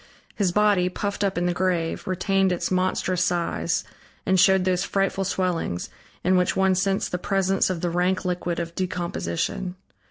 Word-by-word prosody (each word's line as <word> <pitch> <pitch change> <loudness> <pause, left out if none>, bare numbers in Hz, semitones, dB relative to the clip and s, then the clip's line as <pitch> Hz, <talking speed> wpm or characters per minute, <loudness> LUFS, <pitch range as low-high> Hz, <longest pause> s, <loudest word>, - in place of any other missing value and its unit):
His 195 -4 +1
body, 205 -2 +3
puffed 205 +2 -3
up 195 -2 0
in 175 - +1
the 175 - +1
grave, 175 -2 -1
retained 190 +1 +1
its 180 - -2
monstrous 185 -1 +1
size 175 -1 0 0.4
and 190 0 +3
showed 190 0 +5
those 180 -1 +1
frightful 195 0 0
swellings, 180 - -2 0.3
in 185 +1 +3
which 180 0 +1
one 190 0 +3
sensed 195 +1 0
the 180 - -2
presence 195 0 +1
of 180 -3 -2
the 175 - 0
rank 180 +2 0
liquid 175 -1 -2
of 170 -1 -4
decomposition. 180 +1 -3
185 Hz, 165 wpm, -24 LUFS, 175-190 Hz, 0.4 s, showed